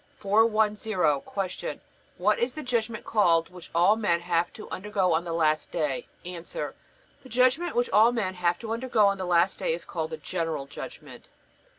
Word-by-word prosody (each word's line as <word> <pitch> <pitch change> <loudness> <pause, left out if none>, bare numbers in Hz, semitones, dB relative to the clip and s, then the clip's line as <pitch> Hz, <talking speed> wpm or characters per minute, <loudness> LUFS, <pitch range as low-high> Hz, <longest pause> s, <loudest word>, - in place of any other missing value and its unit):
410. 215 0 +2 0.2
Q. 190 -2 -4 0.4
What 210 +4 +2
is 245 +2 -1
the 310 - -5
judgment 230 -3 -2
called 165 -6 +3
which 180 -2 -12
all 180 +5 +5
men 175 -6 +1
have 170 0 0
to 215 - -10
undergo 190 -2 0
on 165 +2 0
the 170 - -4
last 155 -2 +1
day? 150 -6 -2 0.2
A. 180 -1 -6
The - - -5 0.6
judgment 255 +8 +2
which 245 0 +1
all 220 +3 +6
men 210 -6 -1
have 175 -1 0
to 225 -1 -5
undergo 230 -3 +2
on 200 -1 +2
the 185 - -2
last 175 +1 +2
day 160 - 0
is 170 - -10
called 160 -2 -3
the 160 - -5
General 160 -2 -3
Judgment. - - -10
190 Hz, 180 wpm, -27 LUFS, 170-220 Hz, 0.6 s, all